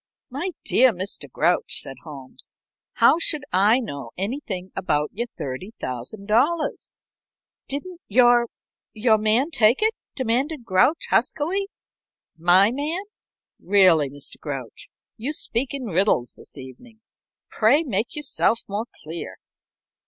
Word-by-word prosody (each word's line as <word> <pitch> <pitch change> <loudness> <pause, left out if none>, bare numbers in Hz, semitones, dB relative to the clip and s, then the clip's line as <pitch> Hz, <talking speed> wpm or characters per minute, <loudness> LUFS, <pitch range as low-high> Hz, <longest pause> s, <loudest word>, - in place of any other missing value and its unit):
"My 285 +9 -3 0.2
dear 260 0 +5
Mr. 185 -7 -5
Grouch," 170 +7 +1
said 135 - -6
Holmes, 140 -5 -11 0.4
"how 330 - +5
should 310 -3 +1
I 205 +6 +5
know 140 - -6
anything 195 -3 -4
about 150 -4 0
your 235 +5 -3
$30,000?" 200 - -2 0.7
"Didn't 345 +6 -5
your 240 +1 +5 0.5
your 220 0 +3
man 225 +9 +2
take 235 - +4
it?" 440 +1 +3 0.2
demanded 260 +2 -1
Grouch, 230 - +2
huskily. 335 - +1 0.7
"My 180 +5 +5
man? 300 +8 -2 0.6
Really, 180 -7 +4
Mr. 140 +1 -7
Grouch, 135 -6 -7 0.3
you 260 +7 -3
speak 255 -3 -1
in 275 -3 -4
riddles 185 - +1
this - - -12
evening. 180 - -13 0.5
Pray 255 +9 +3
make 230 - -2
yourself 275 -5 0
more 205 +3 -3 0.2
clear." 160 +2 -7
220 Hz, 115 wpm, -23 LUFS, 175-270 Hz, 0.7 s, dear